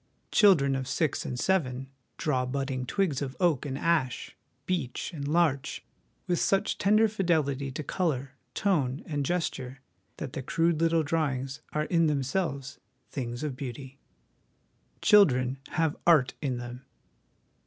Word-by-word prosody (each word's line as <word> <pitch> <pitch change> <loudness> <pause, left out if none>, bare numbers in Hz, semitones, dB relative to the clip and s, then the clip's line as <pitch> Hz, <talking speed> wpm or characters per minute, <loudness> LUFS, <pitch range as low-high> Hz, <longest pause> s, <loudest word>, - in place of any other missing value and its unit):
Children 150 -10 +5
of 130 -1 -3
six 155 -1 0
and 125 - -4
seven 135 -6 0 0.3
draw 130 -5 0
budding 130 -1 -2
twigs 175 -7 0
of 135 -2 -4
oak 165 -6 +2
and 135 -1 -3
ash, 150 -6 0 0.3
beech 170 -4 -2
and 140 -3 -4
larch, 155 -4 +1 0.4
with 175 -1 0
such 195 - +1
tender 215 +3 +4
fidelity 155 -9 0
to 150 +4 -5
colour, 140 -5 -1 0.2
tone, 150 -9 +1
and 145 -3 -2
gesture, 135 -5 -2 0.4
that 130 - -6
the - - -3
crude 165 +4 +1
little 165 -1 +3
drawings 140 -4 -1
are 150 - 0
in 165 0 +2
themselves 140 -1 -2 0.3
things 120 0 -4
of 145 -4 -2
beauty. 135 +1 -7 1.0
Children 135 - +5
have 160 -3 0
'Art 150 -7 +5
' - - -46
in 135 -4 -1
them. 120 +1 -7
140 Hz, 140 wpm, -28 LUFS, 130-165 Hz, 1.0 s, Children